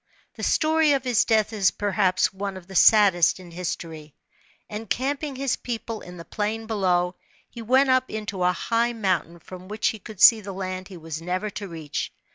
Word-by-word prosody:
The - - -10
story 315 -1 +3
of 270 -2 0
his 245 -4 +2
death 220 -1 +2
is 195 -4 +3
perhaps 195 -3 +1
one 195 0 -5
of 185 - -12
the 190 - -12
saddest 190 -3 +5
in 180 -2 -12
history. 165 -3 -6 0.5
Encamping 265 +7 -3
his 270 -1 -1
people 230 -2 -5
in 180 0 -11
the 170 - -10
plain 215 +5 -3
below, 180 -5 +1 0.3
he 235 - -10
went 260 +4 +3
up 255 0 +2
into 210 -3 -5
a 180 - +4
high 230 +6 0
mountain 185 -6 -1
*rom 185 0 -9
which 215 +1 0
he 220 - -6
could 210 0 -11
see 225 -2 +8
the 200 -1 -7
land 185 0 -5
he 190 - -11
was 160 -1 -7
never 185 +5 -3
to 200 +1 -6
reach. 160 -4 -5
205 Hz, 190 wpm, -24 LUFS, 180-225 Hz, 0.5 s, see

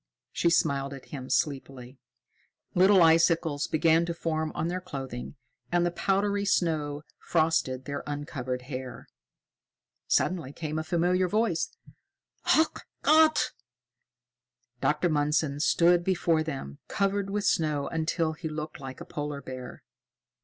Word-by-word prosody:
She 170 - +2
smiled 140 -5 +1
at 135 - -13
him 130 -2 -6
sleepily. 135 -3 -2 0.7
Little 190 0 +6
icicles 165 -2 +3
began 165 +1 +3
to 170 - -3
form 160 -2 -2
on 160 - -1
their 180 +2 -3
clothing, 135 -7 -6 0.4
and 175 0 +3
the 175 - +1
powdery 200 +3 0
snow 155 -6 0 0.2
frosted 155 -6 0
their 140 0 -4
uncovered 130 -4 -4
hair. 130 -2 -7 1.0
Suddenly 165 -7 0
came 155 -1 -3
a - - -2
familiar 175 +2 +1
voice: 210 -3 0 0.9
"Ach 320 +1 +2 0.2
Gott!" 315 0 +5 1.3
Dr. 150 +7 +1
Mundson 150 -2 +1
stood 175 +2 +4
before 170 -3 +2
them, 135 - -5
covered 200 0 0
with 205 0 -2
snow 150 -3 +1
until 160 0 -1
he 160 0 -5
looked 155 +1 -6
like 130 -1 -8
a - - -7
polar 145 -2 -5
bear. 130 -1 -8
155 Hz, 125 wpm, -28 LUFS, 140-175 Hz, 1.3 s, Little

